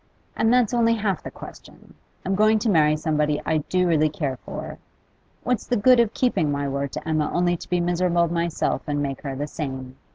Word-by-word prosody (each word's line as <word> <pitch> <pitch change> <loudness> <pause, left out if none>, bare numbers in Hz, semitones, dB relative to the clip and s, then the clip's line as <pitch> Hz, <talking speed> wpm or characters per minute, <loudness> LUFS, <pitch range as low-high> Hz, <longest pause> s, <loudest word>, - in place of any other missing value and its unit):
And 225 - +2
that's 245 -2 +3
only 230 -1 +3
half 200 -5 -1
the - - -7
question: - - -13 0.3
I'm 190 - 0
going 215 +2 +4
to 220 +1 0
marry 155 -3 +4
somebody 150 -1 0
I 160 - +1
do 180 +4 0
really 155 -2 +3
care 145 -4 -3
for. - - -8 0.6
What's 250 -2 -1
the 245 - +1
good 250 +4 +5
of 230 -2 +2
keeping 160 - +1
my 140 0 -1
word 140 0 -3
to - - -6
Emma, 155 -2 0
only 175 0 +1
to - - -10
be 180 - +1
miserable 175 0 +1
myself 170 0 -1
and 145 -1 -1
make 135 -2 -4
her 135 -2 -5
the 145 +2 -3
same? 130 -4 -6
170 Hz, 205 wpm, -23 LUFS, 150-205 Hz, 0.6 s, good